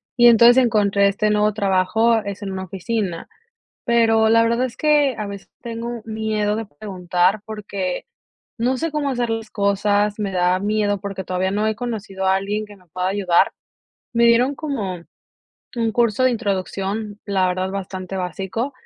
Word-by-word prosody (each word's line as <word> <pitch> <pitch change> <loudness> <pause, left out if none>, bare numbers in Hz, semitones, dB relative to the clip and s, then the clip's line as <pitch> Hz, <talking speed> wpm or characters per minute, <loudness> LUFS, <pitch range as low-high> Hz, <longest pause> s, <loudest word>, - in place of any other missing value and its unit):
Y 240 -1 +6
entonces 235 +2 +7
encontré 200 -3 +3
este 210 +2 +1
nuevo 210 0 +3
trabajo, 205 +3 +2
es 200 +1 -6
en 195 - -4
una 190 0 -4
oficina, 190 -1 -3 0.6
pero 225 -2 +3
la 230 +1 +5
verdad 235 +2 +1
es 240 -1 -10
que 295 -4 +3
a 210 - -3
veces 200 -1 -9
tengo 235 0 -5
miedo 215 -1 -1
de 225 0 -4
preguntar 180 +2 -1
porque, 200 -4 -4 0.5
no 250 +3 +1
sé 325 +2 -3
cómo 290 -2 -1
hacer 245 -2 -1
las 225 -1 -3
cosas, 205 +1 +1
me 205 -2 -1
da 180 0 +2
miedo 205 -1 0
porque 195 -2 -5
todavía 185 +1 -1
no 210 +2 0
he 220 - +1
conocido 210 -5 -4
a 190 - +4
alguien 205 +2 -2
que 205 -1 -14
me 185 - -24
pueda 180 +3 -2
ayudar. 190 -3 +2 0.6
Me 235 0 +3
dieron 245 +4 +4
como 205 - -4 0.7
un 230 -1 +1
curso 235 0 +2
de 255 - +5
introducción, 205 -1 -3
la 190 -2 +1
verdad 185 +1 -1
bastante 190 -1 -5
básico. 190 - -3
210 Hz, 170 wpm, -21 LUFS, 190-230 Hz, 0.7 s, entonces